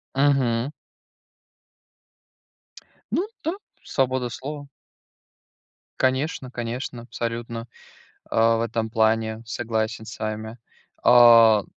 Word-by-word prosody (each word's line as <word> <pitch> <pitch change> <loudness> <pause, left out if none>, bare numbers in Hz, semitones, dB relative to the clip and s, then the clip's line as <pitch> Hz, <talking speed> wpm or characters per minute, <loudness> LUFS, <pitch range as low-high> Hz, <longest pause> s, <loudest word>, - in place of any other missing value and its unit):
Мгм. 135 -3 +2 2.4
Ну 385 +4 0 0.2
да. 325 +3 -1 0.3
Свобода 130 -2 0
слова. 145 +4 -7 1.3
Конечно 130 0 0
конечно, 120 +1 -5
абсолютно, 115 -1 -5 0.6
а, 115 0 +3
в - - -1
этом 115 -1 -2
плане, 110 0 +1
согласен 110 -1 -3
с 115 - -10
вами. 110 +1 -5 0.4
А 115 -3 +7
115 Hz, 80 wpm, -24 LUFS, 110-130 Hz, 2.4 s, А